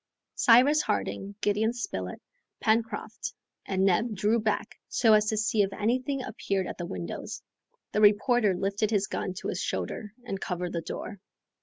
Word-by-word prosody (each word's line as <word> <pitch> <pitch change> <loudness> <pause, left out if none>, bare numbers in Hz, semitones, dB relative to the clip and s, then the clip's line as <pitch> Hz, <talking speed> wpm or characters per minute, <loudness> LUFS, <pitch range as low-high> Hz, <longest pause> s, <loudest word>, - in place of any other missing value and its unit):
Cyrus 260 +6 +6
Harding, 200 +1 -2
Gideon 215 +3 +2
Spilett, 95 - -4 0.4
Pencroft, 225 +1 -1 0.3
and 190 0 +1
Neb 210 +4 +2
drew 210 +4 +2
back, 215 -1 -2
so 225 -3 +4
as 210 0 +5
to 215 - 0
see 215 0 +2
if 195 -1 +1
anything 255 +6 0
appeared 195 -5 -2
at - - -6
the 175 - -3
windows. 85 - -6 0.5
The 210 - +1
reporter 210 0 +4
lifted 200 +3 0
his 205 -3 +2
gun 185 - -3
to - - -4
his - - -2
shoulder 210 -1 -3
and 195 -5 -4
covered 180 -1 -3
the 170 - -1
door. 200 +4 -6
210 Hz, 160 wpm, -28 LUFS, 195-225 Hz, 0.5 s, Cyrus